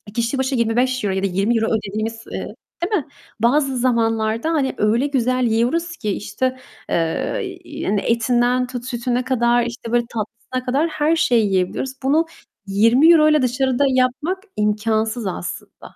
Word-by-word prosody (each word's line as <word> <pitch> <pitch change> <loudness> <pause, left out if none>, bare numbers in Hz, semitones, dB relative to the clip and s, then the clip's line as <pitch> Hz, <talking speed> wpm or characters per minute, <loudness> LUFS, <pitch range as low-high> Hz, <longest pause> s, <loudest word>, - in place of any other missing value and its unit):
kişi 235 +3 0
başı 265 +1 0
€25 235 -2 +1
ya 190 - -2
da - - +3
€20 210 +5 +1
ödediğimiz, 220 +1 -3
eee, - - -5 0.3
değil 380 +5 -1
mi, - - -26 0.3
bazı 270 +3 +2
zamanlarda, 230 0 +1
hani, 275 -4 0
öyle 225 +6 +2
güzel 255 -2 +1
yiyoruz 290 +10 0
ki, 210 - -3
işte, 255 +6 -2 0.3
eee, 340 - -3
hani, 200 -1 +1
etinden 245 +2 +1
tut 245 -1 -6
sütüne 245 0 -1
kadar, 240 -2 +2
işte, 235 -1 -6
böyle 240 0 +2
tatlısına 230 +3 -5
kadar 280 +6 +1
her 310 +1 +1
şeyi 240 -8 +3
yiyebiliyoruz. 195 +7 -1
Bunu 300 +5 +3 0.4
€20'yla 300 +9 +5
dışarıda 255 +1 +1
yapmak 270 +9 0
imkânsız 220 +1 0
aslında. 130 - -7
245 Hz, 140 wpm, -20 LUFS, 225-265 Hz, 0.4 s, €20'yla